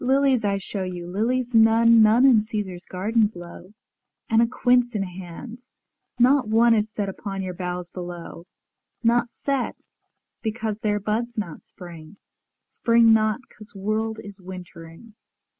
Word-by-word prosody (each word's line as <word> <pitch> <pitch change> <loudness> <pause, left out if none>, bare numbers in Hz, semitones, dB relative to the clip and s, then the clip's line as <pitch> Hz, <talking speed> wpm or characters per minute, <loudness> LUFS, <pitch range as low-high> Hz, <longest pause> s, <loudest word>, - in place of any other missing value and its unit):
Lilies 265 -2 +2
I 200 -1 +1
shew 195 +1 -5
you, 180 -2 -6
lilies 235 +7 -1
none, 225 0 +6
None 220 +4 +5
in 235 -6 +5
Caesar's 205 -5 -5
gardens 210 +4 +1
blow, 175 -3 -11
ŌĆö - - -23 0.6
And 225 0 +5
a 235 - +3
quince 245 -1 +2
in 200 - 0
hand, 190 +6 -9 0.6
ŌĆönot 255 0 +4
one 230 +2 +4
Is 215 -1 +1
set 210 -2 -3
upon 195 0 -5
your 185 -1 -4
boughs 180 -1 -5
below; 175 -1 -8 0.6
Not 235 +1 +3
set, 275 -3 -2 0.7
because 220 -1 -3
their 210 -2 0
buds 225 +4 -3
not 190 -7 -5
spring; 175 0 -13 0.5
Spring 230 -1 +4
not, 215 +2 +2
'cause 215 +1 -16
world 215 +3 -2
is 200 -1 -12
wintering. 180 +2 -11
215 Hz, 145 wpm, -24 LUFS, 185-230 Hz, 0.7 s, none